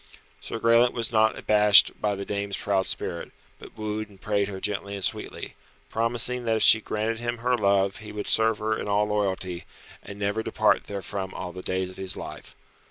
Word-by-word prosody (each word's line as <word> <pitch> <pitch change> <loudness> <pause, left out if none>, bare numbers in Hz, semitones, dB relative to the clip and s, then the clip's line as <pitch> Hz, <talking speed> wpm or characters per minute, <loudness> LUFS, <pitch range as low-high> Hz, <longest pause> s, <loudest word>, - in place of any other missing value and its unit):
Sir - - -5
Graelent 115 +2 +4
was 115 -1 -2
not 110 -1 +3
abashed 105 -1 +6
by 105 -1 0
the 100 0 -6
dame's 100 -1 -3
proud 95 -2 0
spirit, 85 - -4 0.3
but - - -14
wooed 110 0 -4
and 100 -2 -18
prayed 100 -1 0
her 95 -2 -6
gently 100 0 -3
and 100 - -2
sweetly, - - -4 0.4
promising 120 +2 +1
that 115 -1 +2
if 110 - +2
she 110 - +7
granted 110 +2 -2
him 120 0 -3
her 125 +2 +1
love 100 -3 +2
he 105 -1 -10
would 105 -1 -5
serve 110 -1 +2
her 110 +1 -1
in - - -5
all 105 +1 +2
loyalty, 95 -4 -2 0.4
and 100 - -10
never 100 +2 -1
depart - - +1
therefrom 100 -1 -5
all 90 -1 -5
the 90 - -7
days 95 0 -2
of - - -14
his 95 -1 -2
life. - - -9
105 Hz, 200 wpm, -26 LUFS, 100-110 Hz, 0.4 s, she